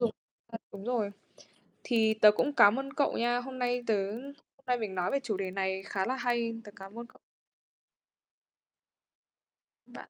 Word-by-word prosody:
dùng 235 -2 +2 0.4
ờ, 225 - -4
đúng 200 0 -9
rồi. 230 -5 0 0.7
Thì 220 -3 +3
tớ 215 -1 +8
cũng 285 +7 0
cám 205 -2 +7
ơn 275 0 -7
cậu 285 - +1
nha, 240 +1 +2
hôm 255 +1 -8
nay 245 0 0
tớ 200 -2 +1
hôm 275 +3 -11
nay 250 -1 +1
mình 210 -4 -4
nói 180 0 0
về 275 - +1
chủ 220 -7 -2
đề 190 -1 -3
này 190 0 -1
khá 190 -2 -1
là 260 - 0
hay, 235 -2 0
tớ 205 - -10
cám 195 +3 -10
ơn 235 - -6
cậu. - - -22 2.7
Bạn. - - -12
230 Hz, 180 wpm, -30 LUFS, 200-250 Hz, 2.7 s, tớ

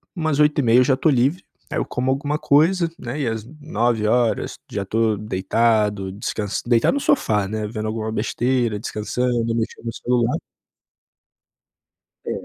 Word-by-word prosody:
umas 155 -3 -1
20:30 140 -5 +4
eu - - +6
já 130 0 +2
tô 155 +4 +2
livre. 140 +7 +2 0.3
Aí - - -1
eu - - -1
como 130 +1 -1
alguma 145 +3 -1
coisa, 165 +5 +3
né, 125 +5 -5
e 135 - -1
às 110 -1 -2 0.2
21h 120 -3 0
já 100 -1 -3
tô 110 +1 +1
deitado, 105 0 +1
descans 105 +1 -3
deitado 120 - +3
no 285 - 0
sofá, 110 - +1
né, 110 +1 -3
vendo 110 0 -4
alguma 110 0 -3
besteira, 120 0 0
descansando, 115 +2 -1
mexendo 115 0 -3
no 115 - -3
celular. 120 -1 0 1.9
É. - - -3
115 Hz, 150 wpm, -22 LUFS, 110-130 Hz, 1.9 s, eu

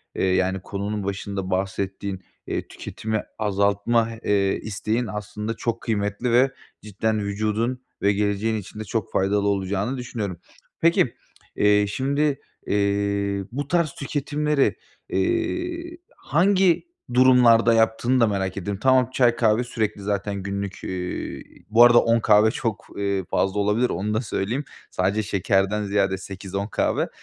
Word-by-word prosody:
eee, - - -1
yani, 95 0 +1
konunun 100 +2 -4
başında 100 -1 -4
bahsettiğin, 95 0 -3 0.2
eee, - - -3
tüketimi 110 -1 -4 0.2
azaltma, 100 +2 +1
eee, 100 -1 +2
isteğin 110 +3 -2
aslında 105 +1 -4
çok 115 0 -3
kıymetli 105 +2 -1
ve 130 +3 +4 0.3
cidden 110 +1 -1
vücudun 110 +5 -1 0.2
ve 100 +1 +3
geleceğin 105 +2 0
için 105 +1 -8
de - - -3
çok 110 0 -3
faydalı 100 +1 +1
olacağını 100 +5 -1
düşünüyorum. 110 -7 -4 0.4
Peki, 165 -7 +3 0.4
eee, 105 0 +4
şimdi, 140 +5 0 0.3
eee, 100 -1 0
bu 140 +3 -4
tarz 170 -2 +1
tüketimleri, 145 0 0 0.3
iii, 345 0 -1 0.2
hangi 190 - +2 0.2
durumlarda 125 -2 +6
yaptığını 115 +3 +2
da 115 - +5
merak 95 -2 -2
ediyorum. 100 0 -3
Tamam, 130 -2 +4
çay, 120 -2 +3
kahve 115 0 +2
sürekli 110 -4 -2
zaten 100 -1 -2
günlük, 100 0 -4
iii, 90 -1 -6
bu 115 +2 +7
arada 120 0 +8
10 115 0 +3
kahve 110 0 +5
çok, 115 -5 -3
eee, 100 -1 -1
fazla 95 +2 0
olabilir. 105 +5 +2
Onu 105 +5 -2
da 110 - +1
söyleyeyim. 115 +3 -2 0.3
Sadece 100 +4 0
şekerden 100 +1 +1
ziyade 100 -1 +1
8-10 95 +1 -5
kahve. - - 0
105 Hz, 135 wpm, -24 LUFS, 100-120 Hz, 0.4 s, arada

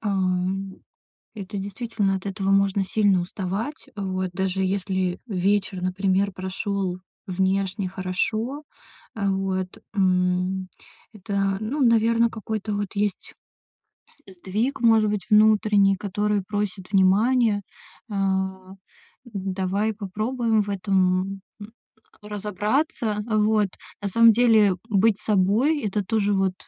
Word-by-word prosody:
ам, 190 -1 -1 0.6
это 200 -1 -6
действительно, 200 0 -2
от 190 - -8
этого 195 0 -2
можно 195 0 +3
сильно 200 -1 +2
уставать. 195 +9 -4
Вот, 185 -2 -3
даже 190 +1 -1
если 185 -1 -1
вечер, 195 -2 0
например, 190 +2 +1
прошел 190 0 -3 0.3
внешне 190 +1 0
хорошо, 215 +9 -2 0.5
а, 200 -3 0
вот, 190 -1 -2 0.2
м, 185 -1 +1 0.4
это, 195 -1 -1
ну, 240 +8 -3
наверно, 230 0 +3
какой-то 220 -1 -4
вот 205 -1 -2
есть 205 -2 -2 0.9
сдвиг, 200 +8 -3
может 225 -2 +4
быть, 210 0 -3
внутренний, 210 -2 +4
который 205 +1 -1
просит 205 -3 -3
внимания. 210 +3 +3 0.5
Э, 205 - -3 1.1
давай 195 0 -2
попробуем 220 +3 -1
в 205 - -5
этом, 190 -1 0 0.2
м, 205 - -8 0.5
разобраться. 210 - -1
Вот, 215 -1 +2 0.3
на 205 - -2
самом 230 +3 +6
деле 220 -4 +4
быть 210 0 +3
собой- 215 +10 +2
это 210 0 -1
тоже 205 -1 +1
вот 195 -1 +1
200 Hz, 110 wpm, -24 LUFS, 190-215 Hz, 1.1 s, самом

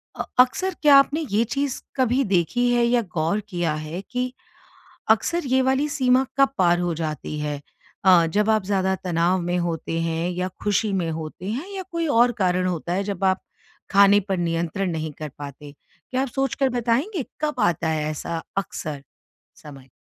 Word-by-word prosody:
अ, - - -3 0.2
अक्सर 360 +9 +3
क्या 290 -2 +7
आपने 295 +3 +3
ये 215 +3 +3
चीज़ 275 +2 -2
कभी 260 0 +2
देखी 245 +9 +1
है 240 - +3
या 240 0 +3
गौर 165 +6 +1
किया 175 -4 -1
है 170 +5 -5
कि 250 0 -2 0.8
अक्सर 345 -1 +2
ये 260 +1 +3
वाली 265 +3 +2
सीमा 260 -1 +3
कब 275 -1 +5
पार 175 -2 +3
हो 175 -1 0
जाती 155 -1 -4
है? 150 -1 -3 0.4
अ, 180 -3 +7
जब 210 +1 +2
आप 215 -2 +3
ज़्यादा 190 -1 +1
तनाव 175 +1 +1
में 175 +1 -1
होते 165 -1 -2
हैं 165 +1 -1
या 180 +1 -2 0.2
खुशी 205 +1 +1
में 175 -4 0
होते 160 +2 -6
हैं 275 - -4
या 380 - -4
कोई 335 -1 -1
और 240 -3 +4
कारण 185 0 +2
होता 175 0 -2
है 195 +2 0
जब 195 -1 -4
आप, 190 0 +2 0.5
खाने 200 +1 +6
पर 190 - +1
नियंत्रण 170 +2 -1
नहीं 160 -1 -3
कर 155 -1 -5
पाते? 145 0 -9 0.4
क्या 255 - +1
आप 270 - 0
सोच 270 -1 0
कर 270 -2 +2
बताएँगे 265 - 0 0.2
कब 300 -1 -1
आता 170 -1 +1
है 155 -1 -1
ऐसा 165 +2 -4 0.2
अक्सर 155 -6 -4 0.5
समय? 135 -3 -13
190 Hz, 185 wpm, -23 LUFS, 165-250 Hz, 0.8 s, क्या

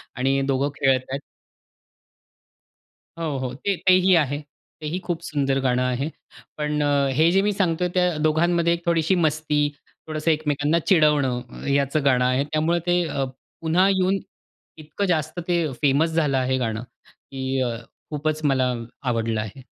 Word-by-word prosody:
आणि 135 +2 +1
दोघं 135 +2 +1
खेळत 130 -2 +2
आहेत. 135 - -2 2.0
हो, 155 -4 -2
हो, 130 -1 -3
ते 195 +9 -1
तेही 185 0 +6
आहे. 145 -2 +1 0.4
तेही 155 +4 -3
खूप 175 -2 -2
सुंदर 140 -3 0
गाणं 125 -1 +2
आहे. 125 +4 -1 0.5
पण 150 0 -1
अ, 140 -1 +2
हे 160 +3 +4
जे 195 +1 +4
मी 210 +1 +1
सांगतो 180 -3 0
आहे 180 - 0
त्या 180 -3 +2
दोघांमध्ये 170 +2 +2
एक 170 0 -5
थोडीशी 170 +2 +2
मस्ती, 150 -1 +1 0.4
थोडंसं 155 +1 0
एकमेकांना 150 +1 +1
चिडवणं 150 -7 +3
ह - - -10
ह्याचं 140 +1 +1
गाणं 125 -2 +3
आहे. 130 +2 +2
त्यामुळे 160 +3 +1
ते 175 0 +3
अ, 140 -2 -2 0.4
पुन्हा 170 +4 +3
येऊन 190 0 +2 0.6
इतकं 155 +6 -4
जास्त 160 -1 -1
ते 170 -2 +1 0.2
फेमस 145 +3 +3
झालं 150 -4 +1
आहे 130 0 +1
गाणं 115 -2 -2 0.2
की 135 0 -5
अ, 120 -2 -1 0.3
खूपच 155 +1 -2
मला 130 -2 +2 0.3
आवडलं 115 -3 0
आहे. 110 +5 -8
150 Hz, 155 wpm, -23 LUFS, 135-170 Hz, 2.0 s, तेही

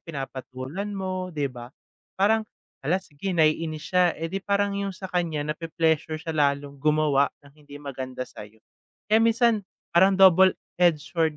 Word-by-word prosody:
pinapatulan 135 +3 -6
mo, 185 -1 -3
'di 145 -6 -3
ba? 120 0 -9 0.5
Parang, 215 +2 +2 0.3
hala, 160 +7 +1
sige 175 +5 -5
nai-inis 155 0 +1
siya, 180 -2 +3
eh, 165 +2 -5
'di 195 - -2
parang 200 +1 0
yung 195 -2 -4
sa 190 -2 -8
kaniya, 165 -4 -1
nape-pleasure 160 0 -1
siya 160 +1 -5
lalong 140 -2 0
gumawa 150 -2 +3 0.2
ng 140 - -17
hindi 145 -1 -14
maganda 130 -3 -6
sa 105 - -11
'yo. 110 +1 -27 0.5
Eh, 220 - +6
minsan 230 -1 +3 0.3
parang 190 +3 +5
double-edged 180 -3 +4
sword 160 -3 +1
160 Hz, 155 wpm, -25 LUFS, 145-185 Hz, 0.5 s, Eh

